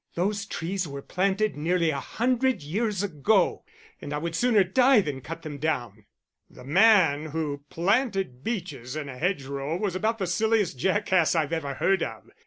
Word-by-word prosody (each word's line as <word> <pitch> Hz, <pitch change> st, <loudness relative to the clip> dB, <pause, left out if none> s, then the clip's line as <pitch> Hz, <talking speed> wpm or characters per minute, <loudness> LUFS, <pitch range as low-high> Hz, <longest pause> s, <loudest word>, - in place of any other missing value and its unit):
Those 200 Hz, +4 st, -1 dB
trees 180 Hz, +2 st, -3 dB
were 140 Hz, -1 st, -7 dB
planted 195 Hz, +3 st, 0 dB
nearly 165 Hz, +2 st, +1 dB
a 140 Hz, -, -3 dB
hundred 250 Hz, -, 0 dB
years 205 Hz, +5 st, -1 dB
ago, 190 Hz, +2 st, +1 dB, 0.4 s
and 145 Hz, -, -6 dB
I -, -, -1 dB
would 165 Hz, +2 st, -3 dB
sooner 220 Hz, +2 st, +3 dB
die 250 Hz, +6 st, +4 dB
than 145 Hz, -8 st, -3 dB
cut 165 Hz, +5 st, -8 dB
them 150 Hz, -3 st, -7 dB
down." 120 Hz, -9 st, -3 dB, 0.4 s
"The -, -, -14 dB
man 165 Hz, -, +4 dB
who 145 Hz, -2 st, -4 dB
planted 195 Hz, -, 0 dB
beeches 155 Hz, -, -4 dB
in 150 Hz, -2 st, -4 dB
a 130 Hz, -, -8 dB
hedgerow 140 Hz, -3 st, -2 dB
was 190 Hz, -2 st, -2 dB
about 220 Hz, +4 st, 0 dB
the 195 Hz, -, -2 dB
silliest 205 Hz, -, +1 dB
jackass 185 Hz, -, +2 dB
I've 160 Hz, -1 st, 0 dB
ever 145 Hz, -4 st, -2 dB
heard 190 Hz, +4 st, +2 dB
of. 110 Hz, -, -5 dB
175 Hz, 170 wpm, -26 LUFS, 145-205 Hz, 0.4 s, die